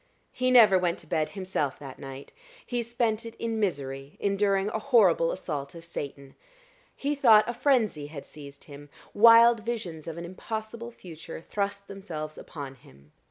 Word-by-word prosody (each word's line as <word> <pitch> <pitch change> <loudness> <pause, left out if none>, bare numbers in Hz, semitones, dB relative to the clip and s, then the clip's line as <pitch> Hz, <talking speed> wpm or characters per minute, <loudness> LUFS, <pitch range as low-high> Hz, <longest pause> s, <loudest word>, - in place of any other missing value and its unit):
He 255 0 0
never 220 -7 +7
went 175 -2 0
to - - -12
bed 155 -1 -1
himself 185 -7 -2
that 135 -2 -10
night. 135 0 -9 0.3
He 245 -1 -2
spent 230 -1 -1
it 230 0 -9
in 225 -1 -3
misery, 140 -7 -3
enduring 200 0 +1
a 220 - -2
horrible 200 -11 +4
assault 145 -5 -5
of 165 0 -10
Satan. 140 -4 -7 0.6
He 285 +1 -1
thought 225 -7 +6
a 240 - -2
frenzy 225 - +1
had 145 -2 -9
seized 140 -2 -12
him. 145 -2 -12 0.2
Wild 230 +2 +7
visions 210 -9 -5
of 165 0 -6
an 170 - -6
impossible 220 +5 -6
future 165 -10 -10
thrust 200 +3 -3
themselves 160 -6 -7
upon 140 -4 -8
him. 70 +2 -20
190 Hz, 160 wpm, -27 LUFS, 150-225 Hz, 0.6 s, never